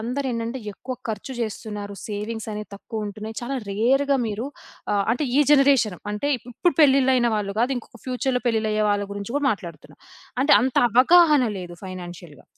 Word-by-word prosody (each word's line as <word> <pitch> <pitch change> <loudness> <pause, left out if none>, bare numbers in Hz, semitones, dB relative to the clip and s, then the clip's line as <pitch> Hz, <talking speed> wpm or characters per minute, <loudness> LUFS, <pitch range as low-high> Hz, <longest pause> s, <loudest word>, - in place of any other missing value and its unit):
అందరేంటంటే 245 0 -3
ఎక్కువ 255 +5 -6
ఖర్చు 220 +5 -4
చేస్తున్నారు. 210 -2 -5
సేవింగ్సనేవి 210 0 -5
తక్కువుంటున్నాయి. 215 +1 -6
చాలా 255 +3 -4 0.2
రేర్‌గా 270 +7 +2
మీరు 220 +4 -3 0.5
ఆహ్, 200 -1 +2
అంటే 270 +5 -1
ఈ - - +7
జనరేషను, 275 - +4
అంటే 245 +8 -2 0.2
ఇప్పుడు 330 +9 +1
పెళ్లిళ్లయిన 265 -3 +4
వాళ్ళు 200 -1 -3
కాదు, 250 +3 +2
ఇంకొక 240 -1 -10
ఫ్యూచర్‌లో 255 0 -1
పెళ్లిళ్లు 220 -2 +1
అయ్యే 215 0 +1
వాళ్ళ 205 0 0
గురించి 205 +3 -6
కూడా 290 -1 0
మాట్లాడుతున్నా. 175 -7 -7 0.5
అంటే 290 - +6
అంత 260 +1 -1
అవగాహన 295 +3 +6
లేదు 175 -1 -8
ఫైనాన్షియల్‌గా. 175 -4 -9
230 Hz, 150 wpm, -23 LUFS, 205-265 Hz, 0.5 s, ఈ